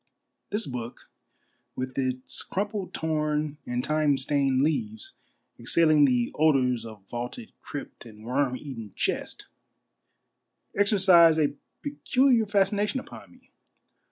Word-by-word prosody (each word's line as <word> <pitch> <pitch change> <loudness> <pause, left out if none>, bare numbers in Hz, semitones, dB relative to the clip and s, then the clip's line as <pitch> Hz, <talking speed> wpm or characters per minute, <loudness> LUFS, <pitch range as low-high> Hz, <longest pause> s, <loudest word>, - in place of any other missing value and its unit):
This 210 +2 -2
book, 120 -2 -7 0.6
with 130 0 -5
its 130 -1 -1
crumpled, 205 0 -3
torn, 150 -1 -1
and 125 0 -2
time 155 -2 +2
stained 135 -1 +1
leaves 220 - -2 0.5
exhaling 155 -3 +4
the 125 -3 +1
odors 125 -6 +2
of 105 -3 -13
vaulted 125 - -6
crypt 140 -4 -8
and 110 -1 -14
worm 130 +1 0
eaten 115 -9 -8
chest, - - -2 1.3
exer 205 +2 +3
cised 170 -4 +6
a - - -19 0.3
peculiar 265 -5 +2
fascination 205 +4 +1
upon - - -12
me. - - -23
150 Hz, 115 wpm, -27 LUFS, 125-200 Hz, 1.3 s, cised